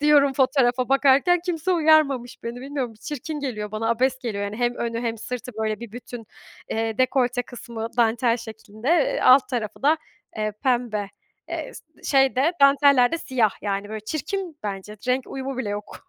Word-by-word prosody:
diyorum 290 -2 +5
fotoğrafa 255 -2 +2
bakarken, 275 +6 +4
kimse 350 +1 0
uyarmamış 310 -7 +3
beni, 235 +1 -5
bilmiyorum. 265 -4 -4
Çirkin 300 +1 -5
geliyor 210 -7 -4
bana, 225 +1 -1
abes 255 +2 +1
geliyor. 210 -5 -3
Yani, 205 +1 -5
hem 240 0 0
önü 230 -1 -3
hem 230 -1 -2
sırtı, 250 +2 -6
böyle, 215 0 -2
bir 235 -3 -9
bütün, 240 -2 -9 0.4
eee, 225 0 -2
dekolte 250 -1 +2
kısmı 235 -2 -7
dantel 235 0 +2
şeklinde, 220 +1 -8
eee, 330 -4 +2
alt 255 +1 +6
tarafı 235 -2 -4
da, 305 +3 +4 0.4
eee, 215 -1 -1
pembe. 240 -6 0 0.4
Eee, - - -5
s - - -11 0.2
şey 270 -2 +3
de 290 +7 +3
danteller 280 -1 +5
de 330 - 0
siyah 245 -8 +1
yani, 200 0 -2
böyle, 220 0 -5
çirkin 325 - -4
bence, 205 0 -5
renk 255 +1 +1
uyumu 270 -1 -5
bile 215 - -2
yok. 205 0 -7
250 Hz, 170 wpm, -24 LUFS, 225-275 Hz, 0.4 s, alt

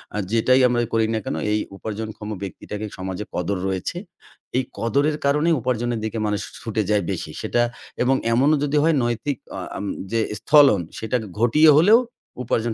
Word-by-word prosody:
আ - - -1
যেটাই 130 +3 +4
আমরাই 120 -1 0
করি 110 -1 +3
না 110 - 0
কেন - - -2 0.2
এই 105 - +2 0.2
উপার্জনক্ষম 110 0 -6
ব্যক্তিটাকে 105 +2 -6
সমাজে 95 +2 -4
কদর 90 +2 -1
রয়েছে। 95 - -3 0.6
এই 130 - +2
কদরের 140 +6 +1
কারণে 150 +4 +2
উপার্জনের 120 -1 -1
দিকে 110 +1 -4
মানুষ 105 -1 -1 0.2
ছুটে 110 -1 -1
যায় 105 -3 +2
বেশি। - - -4
সেটা 120 - +1 0.4
এবং 135 +1 +3 0.2
এমনও 145 +5 +4
যদি 145 +1 +1
হয় 165 -1 +3
নৈতিক 120 +3 -1 0.2
আ - - -4 0.2
আম 100 - -4 0.3
যে 115 - +1 0.2
স্থলন 140 - +5 0.2
সেটা 110 +3 -1
কে 110 - -8
ঘটিয়ে 150 +7 +5
হলেও 210 +9 +7 0.4
উপার্জন 115 0 0
115 Hz, 170 wpm, -22 LUFS, 105-140 Hz, 0.6 s, হলেও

